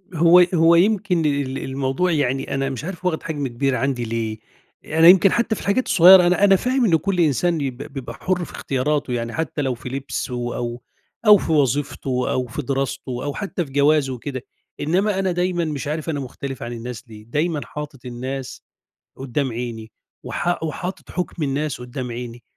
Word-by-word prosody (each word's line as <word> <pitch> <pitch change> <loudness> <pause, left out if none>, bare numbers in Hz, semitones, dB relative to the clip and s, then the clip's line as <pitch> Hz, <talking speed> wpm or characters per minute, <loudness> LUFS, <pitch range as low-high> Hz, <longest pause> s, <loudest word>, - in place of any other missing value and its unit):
هو 170 +2 +6
هو 165 0 +5
يمكن 185 -2 +2
ال 140 -2 0
الموضوع 135 +7 -1
يعني 135 -4 0
أنا 135 0 -1
مش 135 -1 -5
عارف 180 +1 -7
واخد 170 -3 0
حجم 145 -4 -3
كبير 130 +2 -1
عندي 130 -1 -1
ليه، 110 -1 -3 0.5
أنا 160 +1 +4
يمكن 185 +1 +7
حتى 235 -1 +1
في - - -8
الحاجات 205 +6 0
الصغيّرة، 185 -4 +8
أنا 180 +3 +2
أنا 195 -1 +7
فاهم 250 +5 +1
إنه 165 -5 +4
كُلّ 185 +3 -2
إنسان 170 +2 +2
ب 125 - -11 0.2
بيبقى 135 -3 -6
حُر 180 -1 -1
في - - -12
اختياراته، 135 0 -1
يعني 115 -1 -3
حتى 160 -2 -2
لو 135 -2 0
في 120 +2 -8
لِبسه 135 -1 -4 0.2
أو 120 0 -4 0.5
أو 210 - +10
في 165 - -3
وظيفته 140 -3 0
أو 130 -1 -1
في 120 +6 -5
دراسته 135 -2 -3
أو 145 - -3
حتى 190 -2 -3
في 135 - -14
جوازه 145 -1 +3
وكده، 130 +1 -5 0.4
إنما 190 +6 +1
أنا 190 -1 +1
دايمًا 175 -1 0
مش 150 -2 -4
عارف 155 +2 -3
أنا 145 -3 -1
مختلف 135 0 -6
عن 120 - -5
الناس 120 0 -7
ليه، 105 -1 -11
دايمًا 150 +5 -1
حاطط 145 +2 -8
الناس 130 +2 -6 0.6
قدّام 135 -1 -2
عيني، 115 -2 -6 0.3
وحا 175 0 -1
وحاطط 175 +4 -5
حُكم 180 -2 -4
الناس 145 -1 -2
قدّام 125 0 -6
عيني، 120 0 -7
145 Hz, 185 wpm, -21 LUFS, 125-175 Hz, 0.6 s, أو